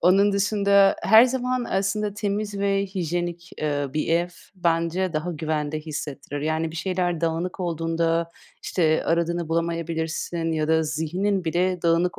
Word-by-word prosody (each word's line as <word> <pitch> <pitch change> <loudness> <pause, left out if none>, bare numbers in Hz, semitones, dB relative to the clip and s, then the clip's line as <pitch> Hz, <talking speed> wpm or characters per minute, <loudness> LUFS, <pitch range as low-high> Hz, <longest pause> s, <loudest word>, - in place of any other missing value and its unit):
onun 195 +3 +4
dışında 200 -1 +4
her 220 +4 +8
zaman 255 -1 -1
aslında 200 +2 -1
temiz 205 0 -2
ve 200 0 +1
hijyenik, 175 -2 -3
eee, 145 -2 -1
bir 155 - -1
ev 170 +2 +2 0.3
bence 170 0 0
daha 155 +3 -2
güvende 155 -1 -2
hissettirir, 145 -2 -6
yani 160 +1 -1
bir 165 - -8
şeyler 175 -2 -1
dağınık 170 +3 -2
olduğunda, 165 0 0 0.3
işte, 160 -3 +1
aradığını 170 0 0
bulamayabilirsin 165 0 -2
ya 155 -1 -1
da 160 0 +3
zihnin 175 +5 -1
bile 180 +2 0
dağınık 170 +1 +2
170 Hz, 140 wpm, -24 LUFS, 160-195 Hz, 0.3 s, her